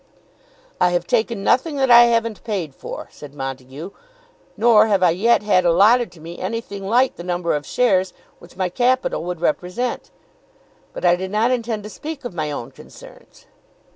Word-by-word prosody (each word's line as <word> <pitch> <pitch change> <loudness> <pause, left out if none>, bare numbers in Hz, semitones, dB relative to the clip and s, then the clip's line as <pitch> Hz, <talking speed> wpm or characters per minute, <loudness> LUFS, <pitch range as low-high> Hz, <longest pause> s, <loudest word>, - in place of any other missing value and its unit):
"I 180 0 +3
have 175 -1 0
taken 220 0 -1
nothing 285 +8 +1
that 265 -2 +1
I 240 0 +9
haven't 230 -2 0
paid 190 - -4
for," - - -8
said 145 -1 -12
Montague. 135 +5 -7 0.7
"Nor 220 -2 +5
have 200 -3 +2
I 175 - +5
yet 210 +6 +2
had 190 -3 +3
allotted 205 +8 +4
to 170 - -16
me 165 +2 -10
anything 200 -1 -5
like 250 +5 +2
the 175 - -8
number 175 -1 -1
of 145 -1 -5
shares 190 -7 +1 0.3
which 175 +1 -17
my 185 -1 -1
capital 250 -1 0
would 175 -2 -5
represent. 180 +9 -2 0.8
But - - -6
I 175 0 +5
did 190 +1 -5
not 215 +5 +1
intend 230 -4 -2
to 210 - -8
speak 300 0 -8
of 245 - -5
my 155 -3 -3
own 140 -5 -6
concerns." - - -16
195 Hz, 175 wpm, -20 LUFS, 175-235 Hz, 0.8 s, I